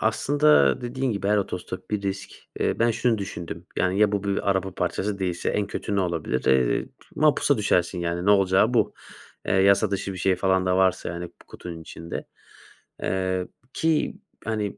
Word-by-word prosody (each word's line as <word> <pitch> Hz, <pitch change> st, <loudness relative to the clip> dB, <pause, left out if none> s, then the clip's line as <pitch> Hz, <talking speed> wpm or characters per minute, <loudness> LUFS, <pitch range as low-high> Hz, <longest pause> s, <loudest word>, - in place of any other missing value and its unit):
aslında 125 Hz, -, +3 dB
dediğin 125 Hz, 0 st, -2 dB
gibi 100 Hz, 0 st, -2 dB
her 105 Hz, -, +4 dB
otostop 95 Hz, -1 st, -4 dB
bir 105 Hz, -1 st, -1 dB
risk. 95 Hz, 0 st, -3 dB, 0.3 s
Eee, -, -, 0 dB
ben 115 Hz, +1 st, +3 dB
şunu 115 Hz, 0 st, +1 dB
düşündüm: 85 Hz, -3 st, -6 dB
"Yani, 95 Hz, +2 st, +1 dB
ya 105 Hz, -1 st, +4 dB
bu 100 Hz, -1 st, -1 dB
bir 100 Hz, 0 st, 0 dB
araba 95 Hz, -1 st, -1 dB
parçası 100 Hz, +3 st, -2 dB
değilse 90 Hz, -2 st, -2 dB
en 105 Hz, -, 0 dB
kötü 100 Hz, 0 st, -3 dB
ne -, -, +3 dB
olabilir? 85 Hz, -8 st, -2 dB
Eee, 65 Hz, -2 st, +2 dB, 0.3 s
mapusa 145 Hz, -2 st, +3 dB
düşersin, 90 Hz, -3 st, +1 dB
yani." 85 Hz, +2 st, -2 dB
Ne -, -, +6 dB
olacağı 95 Hz, -2 st, +4 dB
bu. -, -, +2 dB, 0.5 s
Eee, -, -, 0 dB
yasa 100 Hz, +2 st, +4 dB
dışı 100 Hz, 0 st, -2 dB
bir 95 Hz, -, -7 dB
şey 95 Hz, +1 st, +2 dB
falan 95 Hz, 0 st, +1 dB
da 90 Hz, 0 st, +2 dB
varsa, 95 Hz, -1 st, +2 dB
yani, 85 Hz, +1 st, -5 dB
p -, -, -26 dB
kutunun 85 Hz, -2 st, -9 dB
içinde. 85 Hz, +1 st, -7 dB, 0.8 s
Eee, 95 Hz, -1 st, -1 dB, 0.3 s
ki, 160 Hz, -1 st, 0 dB, 0.3 s
hani 105 Hz, -2 st, -2 dB
95 Hz, 180 wpm, -25 LUFS, 90-105 Hz, 0.8 s, Ne